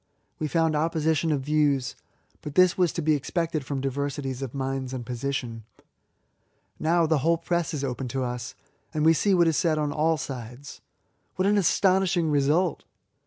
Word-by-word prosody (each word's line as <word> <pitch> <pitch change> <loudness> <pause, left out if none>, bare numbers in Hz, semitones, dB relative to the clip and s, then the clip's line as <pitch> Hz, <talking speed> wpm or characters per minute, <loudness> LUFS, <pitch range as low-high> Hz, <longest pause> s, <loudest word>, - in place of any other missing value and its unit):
We 155 - -1
found 160 0 +1
opposition 160 0 +1
of 145 -3 0
views; 140 -2 +1 0.5
but 150 -1 -8
this 185 -1 +5
was 180 -3 +2
to 170 - -3
be 155 0 +3
expected 155 +1 -2
from 135 0 -4
diversities, 135 -1 -3
of 135 -1 -5
minds 135 -1 -3
and 120 -2 -6
position. 120 -2 -4 1.2
Now 165 +1 +2
the 160 -2 +2
whole 165 +4 +2
press 170 -3 -1
is 145 -3 -4
open 130 -1 -3
to 130 +2 -2
us, 125 -1 -5 0.4
and 155 0 +1
we 160 - +7
see 195 +4 +2
what 170 -2 +4
is 160 - +2
said 160 -3 +1
on 150 -1 -1
all 160 +2 +1
sides. 130 0 -8 0.5
What 185 - 0
an 205 +1 +3
astonishing 185 -3 +2
result! 150 +5 +1
150 Hz, 170 wpm, -26 LUFS, 135-165 Hz, 1.2 s, we